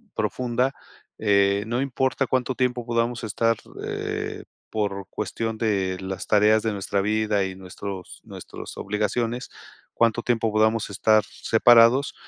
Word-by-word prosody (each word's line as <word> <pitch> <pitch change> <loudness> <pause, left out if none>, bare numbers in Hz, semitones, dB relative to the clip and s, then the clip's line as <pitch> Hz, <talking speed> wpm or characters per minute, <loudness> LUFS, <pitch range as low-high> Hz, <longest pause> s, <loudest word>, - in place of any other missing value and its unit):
profunda. 125 +4 0 0.5
Eh, 100 -1 +3
no 120 +2 -1
importa 135 0 0
cuánto 130 0 0
tiempo 125 -2 -1
podamos 120 0 -1
estar, 115 +2 +1 0.3
eh, 420 0 -4 0.2
por 100 -3 -2
cuestión 115 +1 -3
de 95 -5 0
las 95 0 -5
tareas 105 +1 +4
de 110 - 0
nuestra 100 0 -1
vida 105 0 +1
y 95 0 -5
nuestros 95 0 -8
nuestros - - -10
obligaciones, 115 +4 -2 0.4
cuánto 115 0 +2
tiempo 115 -2 +1
podamos 110 +1 +2
estar 110 +2 +3
separados, 120 +4 +4
110 Hz, 125 wpm, -24 LUFS, 100-120 Hz, 0.5 s, tareas